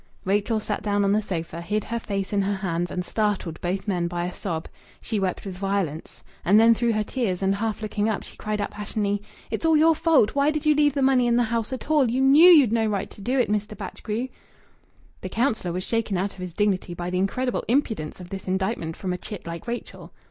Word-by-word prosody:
Rachel 205 +3 +1
sat 210 -1 -3
down 205 0 +1
on 200 - +2
the 210 +1 +3
sofa, 170 -4 -4
hid 210 +4 -1
her 235 0 -3
face 200 -2 -3
in 200 - +2
her 200 +1 0
hands, 175 -3 -2
and 180 0 -3
startled 205 -7 -1
both 190 +3 -2
men 175 -4 0
by 175 0 -2
a 180 - -4
sob. 165 -4 -4 0.3
She 220 -3 -2
wept 190 0 -2
with 185 -2 -6
violence. 195 -6 -3 0.2
And 205 +4 +5
then 230 +1 +7
through 235 0 +1
her 215 0 +1
tears, 200 -6 -2
and 195 0 +3
half 220 +1 -2
looking 210 0 0
up, 215 - -2
she - - -11
cried 210 0 -3
out - - -2
passionately: 205 -1 -2 0.3
"It's - - -3
all 320 -1 +4
your 325 +2 +6
fault. 315 -8 +3
Why 280 +1 +3
did 305 0 -2
you 305 - +6
leave 295 -1 +3
the 275 - +1
money 260 -2 +4
in 235 - +3
the 245 - +4
house 230 0 -1
at 260 +3 -5
all? 285 -6 +4
You 255 +3 0
know 290 +6 +8
you'd 285 -10 +7
no 225 -1 +2
right 205 -2 -2
to - - -13
do 250 +6 0
it, 250 - +3
Mr. 210 +1 -2
Batchgrew!" 230 +5 -4 0.9
The - - -5
councillor 225 -7 0
was 180 +2 -3
shaken 225 -3 -1
out 195 +2 -1
of - - -16
his 180 -2 -6
dignity 195 -4 0
by 175 +1 -4
the 180 - 0
incredible 250 +6 -1
impudence 225 - 0
of 180 -1 -10
this 195 -1 -6
indictment 190 -3 -1
from 185 -2 -3
a 180 - -5
chit 205 -1 -7
like 170 +4 -7
Rachel. 240 0 -6
210 Hz, 240 wpm, -25 LUFS, 190-235 Hz, 0.9 s, know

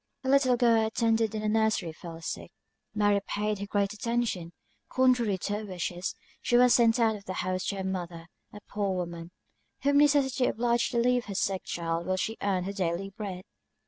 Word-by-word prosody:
A 260 - -2
little 265 -2 +4
girl 230 -2 +4
who 220 - +1
attended 225 -1 +1
in 215 - -2
the 215 - -1
nursery 215 -6 +1
fell 165 0 -9
sick. - - -5 0.4
Mary 205 -1 +3
paid 210 0 -1
her 200 - -5
great 200 0 0
attention; 220 -6 -2 0.4
contrary 245 -6 +2
to 205 +3 -2
her - - -7
wish, 185 -4 -3 0.5
she 240 - +2
was 250 0 +6
sent 230 0 +4
out 225 -2 +3
of 200 -1 -11
the 185 - -4
house 185 0 -1
to 200 - -1
her 190 - -4
mother, 175 -3 -4 0.3
a 210 - -11
poor 200 -2 -1
woman, 170 -2 -5 0.5
whom 285 +1 +4
necessity 280 -3 +3
obliged 235 +1 +1
to - - 0
leave 245 +1 +2
her 200 - -6
sick 190 0 0
child 170 0 -3
while 185 0 0
she 220 +4 -2
earned 190 -3 0
her 200 - -4
daily 190 0 -2
bread. 195 -4 -6
210 Hz, 200 wpm, -28 LUFS, 185-235 Hz, 0.5 s, was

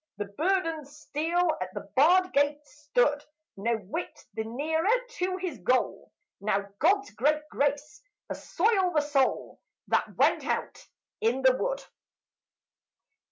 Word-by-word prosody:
The 205 - -2
burdened 325 - -1
steed 300 +3 -4 0.3
at 185 0 -5
the - - -6
barred 360 +7 +5
gate 290 +1 +1
stood, 290 -1 0 0.3
No 230 +4 0
whit 205 -2 -6
the 220 - -2
nearer 315 - -1 0.3
to 370 +1 0
his 360 - -4
goal. 250 +8 0 0.3
Now 200 -1 0
God's 400 +6 +3
great 300 +4 +1
grace 290 +1 -1 0.3
assoil 380 -2 +1
the 300 - +5
soul 290 -2 0 0.3
That - - +1
went - - +3
out - - -3 0.3
in 245 +4 +1
the 260 -1 +6
wood! - - -2
295 Hz, 125 wpm, -28 LUFS, 255-335 Hz, 0.3 s, the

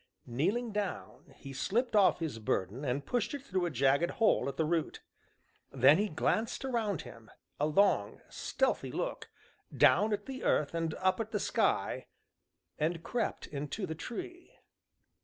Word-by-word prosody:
Kneeling 195 - -1
down, 205 -2 -4
he 135 -1 -9
slipped 225 - 0
off 200 -3 +5
his 150 -9 -3
burden 105 +4 -2
and 135 +1 -1
pushed 245 - -1
it 280 - -7
through 185 -9 -1
a - - -1
jagged 140 +3 +2
hole 220 -10 +2
at - - -8
the 160 - +2
root. 165 0 -1 0.7
Then 135 +5 +6
he 210 0 +1
glanced 220 - 0
round 225 - -1
him, 115 -1 -13 0.3
a 150 - +2
long, 155 - +2
stealthy - - -1
look, - - -4 0.5
down 210 +5 +5
at 205 0 -1
the 265 -1 -6
earth 150 - +2
and 165 -1 -1
up 185 0 +1
at 220 -1 -2
the 215 -2 -1
sky, - - 0 0.7
and 165 +2 -1
crept 240 -2 -2
into 150 +8 -4
the 160 - -4
tree. 350 - -8
175 Hz, 160 wpm, -32 LUFS, 145-220 Hz, 0.7 s, Then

